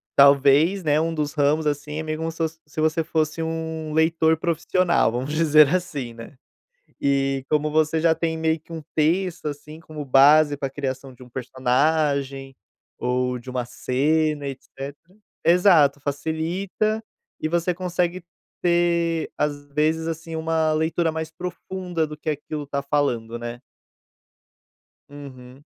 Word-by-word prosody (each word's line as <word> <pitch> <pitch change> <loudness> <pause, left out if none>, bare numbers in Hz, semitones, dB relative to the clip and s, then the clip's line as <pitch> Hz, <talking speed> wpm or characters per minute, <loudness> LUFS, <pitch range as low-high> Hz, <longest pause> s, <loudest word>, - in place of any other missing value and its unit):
talvez, 140 +7 +5
né, 150 0 +3
um 165 +1 0
dos 150 -2 -2
ramos 150 +1 +2
assim, 150 +1 -2
é - - -3
meio 155 0 -3
como 165 0 -2
se 160 - -15
fos 160 -1 -2
se 155 +1 -4
você 160 +1 +1
fosse 155 0 -1
um 160 -1 -4
leitor 160 0 +3
profissional, 170 -3 +1
vamos 130 +5 -3
dizer 155 -2 +6
assim, 145 -9 -2
né. 115 +5 -11 0.6
E 135 -1 +1
como 150 0 +1
você 155 +1 +2
já 165 0 +4
tem 160 0 -2
meio 160 0 0
que 165 - -19
um 160 -2 -6
texto, 165 +2 +1
assim, 150 +2 -7
como 155 -3 -8
base 145 +3 +6
pra 135 -1 -3
criação 135 -1 -5
de 125 - -14
um 125 - -16
personagem, 135 +2 0 0.4
ou 125 0 -1
de 130 - -11
uma 125 -1 -2
cena, 150 +4 0
etecetera. 140 +7 -9 0.3
Exato, 170 -5 +5
facilita. 165 +9 -2 0.4
E - - -1
você 170 +2 0
consegue 180 0 -2 0.4
ter, 170 -1 +1
às 145 -1 -2
vezes, 155 +3 0
assim, 165 0 -5
uma 160 0 +1
leitura 160 +1 +1
mais 160 0 -4
profunda 180 -1 -4
do 150 0 -8
que 155 +1 -5
aquilo 150 0 -4
tá 140 -1 -3
falando, 120 -5 -1
né. 120 0 -6 1.5
Uhum. 135 -2 -12
155 Hz, 145 wpm, -23 LUFS, 140-165 Hz, 1.5 s, dizer